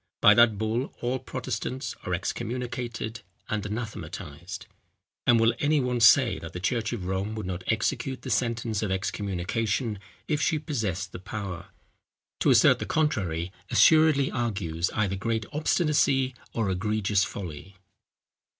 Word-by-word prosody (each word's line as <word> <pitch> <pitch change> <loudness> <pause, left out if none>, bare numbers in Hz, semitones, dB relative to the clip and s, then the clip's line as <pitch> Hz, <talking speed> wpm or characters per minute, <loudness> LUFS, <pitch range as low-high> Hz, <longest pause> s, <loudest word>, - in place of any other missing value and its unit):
By - - +8
that 115 -3 +5
bull 110 +5 -1
all 125 +2 -1
Protestants 130 0 -4
are 90 - 0
excommunicated 120 +2 -4 0.3
and 105 -1 -1
anathematized; 95 -6 -6 0.6
and 120 -1 +6
will 115 +1 +4
any 150 +1 +3
one 125 -2 0
say 115 +2 +6
that 80 0 -9
the 90 - -4
church 115 +4 -1
of 110 -7 -4
Rome 95 +3 -2
would 110 - -4
not 90 0 -4
execute 120 +3 -1
the 130 - -4
sentence 115 -2 0
of 105 - -1
excommunication 105 +3 -1 0.3
if 150 -1 0
she 160 0 +2
possessed 110 - -3
the - - -7
power? 95 -3 -6 0.7
To - - +3
assert - - +6
the - - -4
contrary 95 - 0 0.2
assuredly 155 -4 +5
argues 95 -8 -1
either 100 -3 +1
great 110 +2 -1
obstinacy 145 -4 +2 0.2
or 110 -4 0
egregious 100 +1 +1
folly. 95 -1 -7
110 Hz, 140 wpm, -27 LUFS, 95-125 Hz, 0.7 s, By